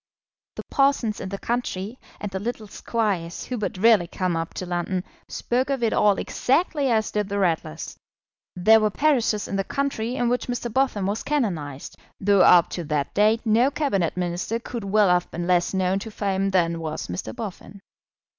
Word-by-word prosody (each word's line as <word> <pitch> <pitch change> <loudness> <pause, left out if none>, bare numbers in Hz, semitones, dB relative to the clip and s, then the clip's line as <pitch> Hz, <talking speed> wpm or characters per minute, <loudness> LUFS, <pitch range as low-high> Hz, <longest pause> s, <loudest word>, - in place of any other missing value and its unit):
The - - -6
parsons 275 -6 +2
in 190 - -5
the 200 - -4
country, 230 -1 -3 0.2
and 205 - -5
the 190 - -3
little 225 +1 -4
squires 200 -5 -2
who 250 - -4
but 205 - -3
rarely 210 -3 +5
come 180 0 -2
up 165 0 -3
to 185 - -4
London, 180 +1 -2 0.2
spoke 255 +3 -1
of 270 -3 -1
it 225 - +2
all 205 -2 +3
exactly 285 0 0
as 220 -2 +1
did 210 -1 -1
the 200 - -3
Ratlers. 165 - -2 0.6
There 220 +5 +6
were 215 -1 +2
parishes 235 -5 +1
in 195 - -2
the 195 - 0
country 255 -2 -2
in 245 -2 0
which 245 +1 0
Mr. 245 -2 -3
Boffin 255 -7 +1
was 205 +3 -1
canonised, 170 - -3 0.2
though 200 -1 +4
up 175 -2 +7
to 175 - -4
that 145 -2 -2
date 215 +3 +3
no 230 +4 +4
Cabinet 200 - -1
Minister 180 +5 -2
could 235 -1 -6
well 205 0 +3
have 180 0 +2
been 170 +1 -4
less 175 -1 +2
known 190 0 +1
to 220 - -7
fame 195 -2 -1
than 170 -3 +1
was 155 -1 -4
Mr. 90 +5 -5
Boffin. 200 -1 -8
205 Hz, 185 wpm, -24 LUFS, 180-235 Hz, 0.6 s, up